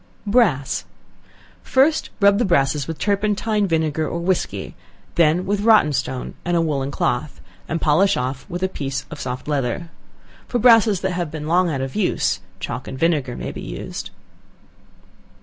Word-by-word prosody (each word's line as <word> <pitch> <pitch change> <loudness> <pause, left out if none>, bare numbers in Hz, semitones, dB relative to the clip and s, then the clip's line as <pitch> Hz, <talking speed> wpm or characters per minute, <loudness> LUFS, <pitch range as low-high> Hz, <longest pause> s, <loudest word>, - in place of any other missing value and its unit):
Brass. 200 - +2 0.8
First 285 +4 +2
rub 200 0 +5
the - - +3
brasses 145 - +1
with 165 -1 -4
turpentine, 210 +1 0
vinegar 160 -2 0
or - - -3
whiskey, 175 +1 -2 0.4
then 170 +2 +3
with 200 +1 0
rotten 210 -9 +5
stone 130 -1 -3
and 175 0 +1
a - - +3
woollen 140 -4 -1
cloth, 135 +1 -2 0.3
and 165 - -2
polish 165 +7 +3
off 130 +1 -3
with 175 +2 -4
a - - +3
piece 135 -6 -4
of 150 - -7
soft 125 +1 -5
leather. 145 +3 -2 0.6
For 245 - -1
brasses 225 -5 +5
that 190 - -1
have 175 -3 -2
been 155 0 -6
long 175 +3 +2
out 140 -4 -2
of 135 0 -4
use, 210 -4 +1 0.2
chalk - - -5
and 130 - -6
vinegar 145 -5 +1
may - - -4
be - - -8
used. - - -6
165 Hz, 165 wpm, -21 LUFS, 140-200 Hz, 0.8 s, rub